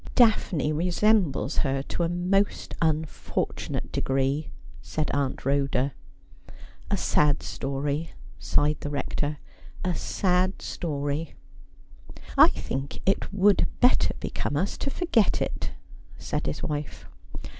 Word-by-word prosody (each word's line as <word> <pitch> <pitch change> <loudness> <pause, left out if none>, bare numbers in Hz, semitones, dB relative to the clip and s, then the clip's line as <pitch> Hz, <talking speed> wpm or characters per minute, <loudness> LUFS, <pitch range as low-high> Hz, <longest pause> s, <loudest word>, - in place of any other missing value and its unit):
' - - -18
Daphne 185 - +3
resembles 175 -3 +2
her 135 -1 +1
to 175 - -4
a 170 - +2
most 185 +3 0
unfortunate 160 -1 -1
degree,' 135 +3 0 0.3
said 155 -1 -2
Aunt 140 -3 -1
Rhoda. 140 -1 +1 0.5
' - - -18
A - - +1
sad 150 -1 +2
story,''sighed 145 +1 -2
the 145 - -4
Rector; 145 +1 -2 0.3
' - - -12
a 180 - +1
sad 185 +1 +1
story.' 145 -1 -3 1.0
'I - - +9
think 135 +1 -4
it 195 - +1
would 200 0 +4
better 250 +1 +4
become 145 - -2
us 190 +6 0
to - - -1
forget 275 - +2
it,' - - -2 0.5
said - - -3
his 75 - -3
wife. 150 -1 -4
150 Hz, 120 wpm, -26 LUFS, 140-185 Hz, 1.0 s, I